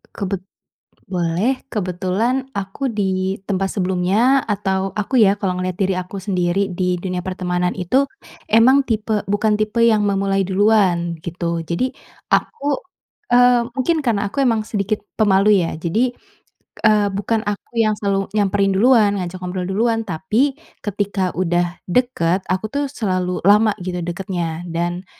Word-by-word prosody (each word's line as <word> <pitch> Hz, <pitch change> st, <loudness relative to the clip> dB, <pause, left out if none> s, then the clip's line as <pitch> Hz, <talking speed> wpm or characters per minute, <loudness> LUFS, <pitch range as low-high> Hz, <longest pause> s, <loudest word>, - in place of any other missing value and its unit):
Kebet 195 Hz, -2 st, -3 dB, 0.6 s
boleh 185 Hz, +8 st, -1 dB
kebetulan 210 Hz, +7 st, -1 dB
aku 200 Hz, +8 st, -3 dB
di 190 Hz, -2 st, -1 dB
tempat 195 Hz, -1 st, -1 dB
sebelumnya 195 Hz, +8 st, +2 dB
atau 195 Hz, -2 st, -1 dB
aku 225 Hz, +4 st, +2 dB
ya, 200 Hz, 0 st, +4 dB
kalau 190 Hz, -2 st, -1 dB
ngelihat 185 Hz, -1 st, -3 dB
diri 195 Hz, -1 st, +1 dB
aku 185 Hz, +2 st, -5 dB
sendiri 185 Hz, 0 st, -1 dB
di 180 Hz, 0 st, 0 dB
dunia 180 Hz, 0 st, -3 dB
pertemanan 180 Hz, -1 st, -2 dB
itu 260 Hz, +11 st, +1 dB, 0.4 s
emang 255 Hz, +5 st, +6 dB
tipe, 215 Hz, -1 st, 0 dB
bukan 210 Hz, +1 st, +2 dB
tipe 215 Hz, +2 st, +1 dB
yang 215 Hz, -2 st, +4 dB
memulai 195 Hz, -1 st, +1 dB
duluan 190 Hz, -3 st, +2 dB
gitu. 170 Hz, -1 st, -3 dB
Jadi, 175 Hz, +11 st, -2 dB, 0.4 s
aku, 285 Hz, -1 st, 0 dB, 0.5 s
eee, 245 Hz, 0 st, +5 dB, 0.2 s
mungkin 315 Hz, +4 st, +1 dB
karena 220 Hz, -6 st, 0 dB
aku 275 Hz, -, -1 dB
emang 225 Hz, -4 st, +1 dB
sedikit 210 Hz, 0 st, -1 dB, 0.2 s
pemalu 200 Hz, -1 st, +4 dB
ya. 165 Hz, -1 st, -3 dB
Jadi, 215 Hz, +10 st, 0 dB, 0.7 s
eee, 210 Hz, -1 st, +4 dB
bukan 215 Hz, +2 st, -1 dB
aku 205 Hz, +3 st, -5 dB
yang 215 Hz, -1 st, +3 dB
selalu 195 Hz, -1 st, 0 dB
nyamperin 200 Hz, -1 st, +2 dB
duluan 220 Hz, 0 st, +5 dB
ngajak 180 Hz, +1 st, -5 dB
ngobrol 180 Hz, 0 st, -4 dB
duluan 225 Hz, +3 st, +1 dB
tapi 220 Hz, -, 0 dB, 0.2 s
ketika 200 Hz, -2 st, -1 dB
udah 175 Hz, 0 st, 0 dB
deket, 190 Hz, -5 st, +1 dB
aku 185 Hz, +3 st, 0 dB
tuh 285 Hz, 0 st, 0 dB
selalu 185 Hz, -8 st, -2 dB
lama 210 Hz, +1 st, +5 dB
gitu 180 Hz, -1 st, -3 dB
dekatnya. 175 Hz, -1 st, -4 dB
Dan 175 Hz, +2 st, -3 dB
195 Hz, 140 wpm, -20 LUFS, 180-220 Hz, 0.7 s, emang